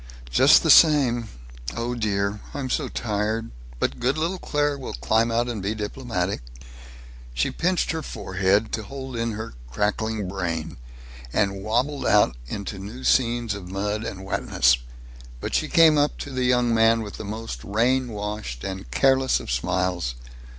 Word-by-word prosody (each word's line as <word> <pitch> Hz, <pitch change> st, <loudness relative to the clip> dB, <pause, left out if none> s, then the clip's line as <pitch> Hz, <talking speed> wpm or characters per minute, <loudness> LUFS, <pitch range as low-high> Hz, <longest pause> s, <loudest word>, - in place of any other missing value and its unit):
"Just -, -, +6 dB
the -, -, +5 dB
same 130 Hz, -8 st, +5 dB, 0.5 s
Oh 120 Hz, +1 st, -2 dB
dear, 105 Hz, -3 st, -1 dB, 0.2 s
I'm 135 Hz, -3 st, -3 dB
so 145 Hz, -, 0 dB
tired. 110 Hz, +1 st, -2 dB, 0.3 s
But -, -, -1 dB
good 125 Hz, +4 st, +1 dB
little 170 Hz, +4 st, -1 dB
Claire 145 Hz, -2 st, 0 dB
will 135 Hz, -2 st, -6 dB
climb 110 Hz, -, +2 dB
out 120 Hz, +1 st, +1 dB
and 115 Hz, -4 st, -3 dB
be 100 Hz, +3 st, -2 dB
diplomatic." 105 Hz, -, -3 dB, 0.9 s
She -, -, +1 dB
pinched 180 Hz, +1 st, 0 dB
her 160 Hz, -1 st, -3 dB
forehead, 95 Hz, -3 st, 0 dB
to 110 Hz, -, -2 dB
hold 130 Hz, +3 st, -7 dB
in 115 Hz, -1 st, -1 dB
her 110 Hz, +2 st, -6 dB, 0.2 s
cracking 105 Hz, -, -1 dB
brain, 85 Hz, -4 st, -3 dB, 0.5 s
and 100 Hz, -, 0 dB
wabbled 125 Hz, +7 st, 0 dB
out 105 Hz, -12 st, +4 dB
into 100 Hz, +5 st, -5 dB
new 110 Hz, +7 st, -8 dB
scenes 120 Hz, -4 st, +2 dB
of 95 Hz, -3 st, -8 dB
mud 105 Hz, +3 st, -2 dB
and 95 Hz, -3 st, -6 dB
wetness, 65 Hz, -8 st, +2 dB, 0.6 s
but -, -, -5 dB
she -, -, +1 dB
came 160 Hz, -3 st, +6 dB
up 145 Hz, +1 st, +1 dB
to 145 Hz, -, -6 dB
the 130 Hz, -1 st, -1 dB
young 125 Hz, -1 st, +3 dB
man 115 Hz, 0 st, +4 dB
with 105 Hz, -, -8 dB
the -, -, -6 dB
most 105 Hz, -, -6 dB
rain 125 Hz, +5 st, +1 dB
washed 105 Hz, -, -5 dB
and 95 Hz, 0 st, -5 dB
careless 135 Hz, -1 st, +3 dB
of -, -, -6 dB
smiles. 90 Hz, +1 st, -1 dB
110 Hz, 160 wpm, -24 LUFS, 100-125 Hz, 0.9 s, Just